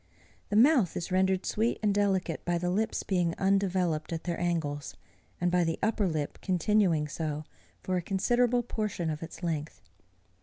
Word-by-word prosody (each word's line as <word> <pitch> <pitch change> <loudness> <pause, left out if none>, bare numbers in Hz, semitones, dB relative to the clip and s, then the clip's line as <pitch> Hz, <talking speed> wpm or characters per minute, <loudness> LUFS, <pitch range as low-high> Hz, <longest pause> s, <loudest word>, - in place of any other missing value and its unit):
The 205 - -1
mouth 240 - +5
is 175 - -4
rendered 190 0 +2
sweet 225 +3 0
and 205 -1 +3
delicate 195 -4 0
by 175 0 0
the 175 +1 -1
lips 215 +4 0
being 175 -3 0
undeveloped 190 -5 +1
at 165 -1 -3
their 175 -1 -3
angles, 145 - -2 0.4
and 175 0 +1
by 180 0 +3
the 165 -1 -1
upper 210 -2 +2
lip 155 -4 -3
continuing 180 -4 +2
so, 150 0 -3 0.4
for 185 0 0
a - - 0
considerable 240 +7 +1
portion 210 -8 -2
of 150 - -5
its 165 +2 -9
length. 160 -3 -3
180 Hz, 165 wpm, -29 LUFS, 165-200 Hz, 0.4 s, mouth